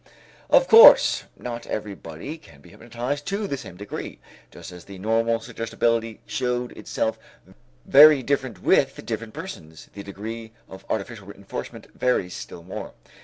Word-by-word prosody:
Of - - +5
course, 460 +2 +8
not 120 -1 -7
everybody 105 - -6
can 155 - -18
be - - -17
hypnotized 120 +5 -5
to 200 +2 -2
the 165 - -2
same 130 -9 -10
degree. 105 +1 -7 0.3
Just - - -11
as 90 -1 -12
the 100 -1 -11
normal 115 +3 +1
suggestibility 115 0 -2
showed 125 +3 -2
itself - - -3 0.7
very 145 0 +8
different 130 -8 -2
with - - +2
different 110 -1 -5
persons, 80 0 -10
the 100 - -8
degree 110 +3 -8
of 95 - -12
artificial 105 -1 -4
reënforcement 100 -1 -9
varies 100 -8 0
still 85 - -9
more. 90 - -7
115 Hz, 140 wpm, -24 LUFS, 100-130 Hz, 0.7 s, course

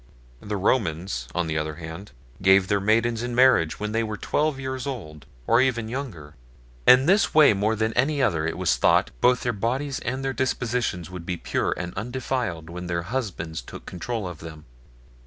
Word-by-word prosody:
The 105 +6 -4
Romans, 90 - 0
on 90 - +1
the 80 -1 -1
other 75 0 -4
hand, 80 +5 -8 0.3
gave 95 0 +5
their 100 -1 +2
maidens 115 +3 +2
in 120 0 -3
marriage 125 -11 +4
when 105 0 -3
they 115 +1 +1
were 110 -1 -4
twelve 150 +3 0
years 130 0 -4
old, 80 - -7 0.2
or 115 +2 +4
even 120 -4 0
younger. 110 - -6 0.5
In 125 +1 +8
this 195 +1 +3
way 155 -7 +7
more 105 +3 +1
than 110 +1 -1
any 140 +3 +1
other, 80 - +1
it - - -3
was - - +1
thought, - - +3
both 125 0 +4
their 120 - -1
bodies 130 +6 -2
and 130 +3 -3
their 135 - -1
dispositions 120 -8 -1
would 90 -2 -7
be 90 - -2
pure - - -1
and 90 0 -5
undefiled 120 -6 -3
when 90 +1 -7
their 85 -1 -2
husbands 90 - -4
took - - -11
control 105 +3 -4
of 90 -4 -8
them. 80 -2 -10
110 Hz, 190 wpm, -25 LUFS, 85-125 Hz, 0.5 s, In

